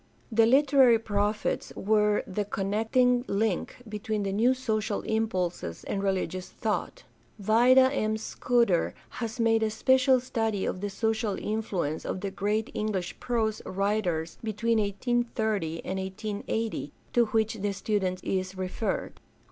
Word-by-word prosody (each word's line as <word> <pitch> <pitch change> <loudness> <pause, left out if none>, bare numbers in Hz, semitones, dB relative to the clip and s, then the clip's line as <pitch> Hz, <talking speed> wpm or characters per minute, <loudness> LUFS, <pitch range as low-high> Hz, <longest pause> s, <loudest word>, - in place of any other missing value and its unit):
— - - -14
^The 225 0 +5
literary 265 -3 +6
prophets 210 -1 -1
were 210 0 +2
the 200 +2 -2
connecting 225 +5 +1
link 215 +3 -1
between 210 0 -3
the 195 -1 -2
new 240 +6 +3
social 215 -5 -1
impulses 185 - -2
and 195 - -2
religious 185 -1 -2
thought. - - -3 0.3
Vida 245 +6 +5
M. 215 -4 0
Scudder 235 -4 +1 0.3
has 230 +1 -4
made 225 -1 +3
a 220 - +2
special 260 +4 +4
study 225 -5 -1
of 185 - -3
the 205 - -2
social 220 0 -1
influence 195 -8 -2
of 185 - -4
the 200 -1 -3
great 210 +3 -1
English 200 -4 -3
prose 225 -3 -1
writers 185 -5 -1
between 225 +1 0
1830 215 -5 -1
and 190 +1 -2
1880, 210 +3 -3 0.2
to 240 -1 +4
which 220 -1 0
the 205 0 0
student 190 -2 -1
is 185 0 -2
referred. 185 +4 -3
215 Hz, 135 wpm, -28 LUFS, 195-230 Hz, 0.3 s, literary